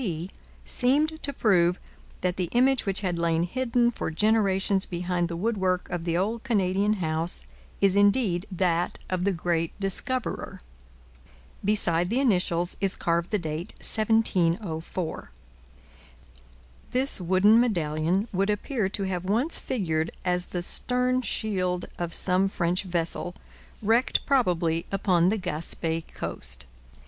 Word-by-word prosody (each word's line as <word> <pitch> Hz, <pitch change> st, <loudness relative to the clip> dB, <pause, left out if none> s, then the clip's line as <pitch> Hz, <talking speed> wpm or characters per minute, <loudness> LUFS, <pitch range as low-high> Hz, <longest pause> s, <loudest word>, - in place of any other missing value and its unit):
C. 175 Hz, -5 st, -3 dB, 0.3 s
seemed 300 Hz, +5 st, +1 dB
to 280 Hz, -, -1 dB
prove 180 Hz, -8 st, +2 dB, 0.4 s
that 180 Hz, -1 st, 0 dB
the 180 Hz, -3 st, -2 dB
image 255 Hz, -1 st, +3 dB
which 195 Hz, +1 st, 0 dB
had 180 Hz, -4 st, -1 dB
lain 165 Hz, 0 st, +1 dB
hidden 240 Hz, +4 st, +1 dB
for -, -, -4 dB
generations 195 Hz, +1 st, +2 dB
behind 175 Hz, 0 st, -1 dB
the 170 Hz, 0 st, -5 dB
woodwork 190 Hz, -3 st, 0 dB
of 175 Hz, -1 st, -3 dB
the 170 Hz, -1 st, 0 dB
old 215 Hz, +5 st, -1 dB
Canadian 205 Hz, -3 st, +1 dB
house 165 Hz, -3 st, -1 dB, 0.4 s
is 195 Hz, -1 st, +4 dB
indeed 205 Hz, -3 st, +3 dB
that 175 Hz, -1 st, 0 dB
of 180 Hz, 0 st, 0 dB
the 200 Hz, -, +3 dB
great 170 Hz, -1 st, -2 dB
discoverer. 215 Hz, +6 st, -2 dB, 1.0 s
Beside 180 Hz, -4 st, +1 dB
the 240 Hz, +5 st, +1 dB
initials 180 Hz, -8 st, +1 dB
is 195 Hz, -1 st, +1 dB
carved 170 Hz, +1 st, 0 dB
the 210 Hz, -, +1 dB
date 160 Hz, -1 st, -4 dB
1704.. 185 Hz, -, 0 dB, 1.6 s
This 255 Hz, -5 st, +2 dB
wooden 190 Hz, +5 st, +5 dB
medallion 175 Hz, -3 st, +1 dB
would 195 Hz, +2 st, +1 dB
appear 210 Hz, 0 st, -1 dB
to 200 Hz, -, -3 dB
have 185 Hz, -2 st, -3 dB
once 235 Hz, -, +2 dB
figured 165 Hz, -9 st, -1 dB, 0.2 s
as 180 Hz, 0 st, +1 dB
the 175 Hz, -1 st, -3 dB
stern 250 Hz, +6 st, +1 dB
shield 185 Hz, -7 st, -1 dB
of 175 Hz, -1 st, -2 dB
some 185 Hz, +2 st, +2 dB
French 180 Hz, 0 st, -1 dB
vessel, 175 Hz, 0 st, -1 dB, 0.5 s
wrecked 230 Hz, +5 st, +2 dB
probably 175 Hz, -, +1 dB
upon 185 Hz, -3 st, +3 dB
the 220 Hz, -, +1 dB
Gaspe 165 Hz, -2 st, -2 dB
coast. 65 Hz, +3 st, -4 dB
185 Hz, 130 wpm, -26 LUFS, 170-215 Hz, 1.6 s, wooden